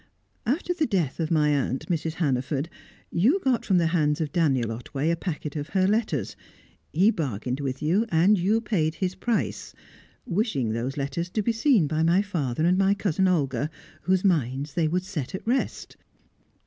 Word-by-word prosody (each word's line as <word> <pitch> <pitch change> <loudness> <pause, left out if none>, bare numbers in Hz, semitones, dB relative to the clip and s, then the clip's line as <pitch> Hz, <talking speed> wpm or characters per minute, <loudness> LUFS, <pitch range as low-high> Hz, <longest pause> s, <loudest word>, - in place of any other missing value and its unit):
After 325 +8 0
the 320 -3 0
death 175 - -1
of 160 -2 -1
my 150 -2 +3
aunt, 135 -2 0
Mrs. 165 -2 -1
Hannaford, 140 -1 -1 0.4
you 245 - +3
got 255 -3 +1
from 190 - +2
the 170 - +3
hands 150 -3 +2
of 155 -3 -2
Daniel 135 - +1
Otway 135 +7 -2
a - - +2
packet 155 -4 -5
of 145 0 -4
her 190 -1 +2
letters; 200 - 0 0.6
he 190 +8 +4
bargained 130 - -3
with 135 0 -3
you, 190 +9 +2
and 175 +5 +4
you 205 +5 +1
paid 165 -8 0
his 185 0 -1
price, 235 +3 -2 0.5
wishing 175 - 0
those 120 +5 -3
letters 140 +5 -2
to 210 +3 -1
be 235 - +2
seen 225 - +3
by 155 +2 -1
my 170 +5 +3
father 155 -7 -1
and 180 +2 +3
my 195 +1 +3
cousin 190 -2 +1
Olga, 145 -6 0 0.3
whose 185 +1 +1
minds 140 -5 0
they 165 -1 +1
would 180 +3 0
set 185 -6 -5
at - - -7
rest. 250 +4 -2
165 Hz, 180 wpm, -26 LUFS, 145-195 Hz, 0.6 s, he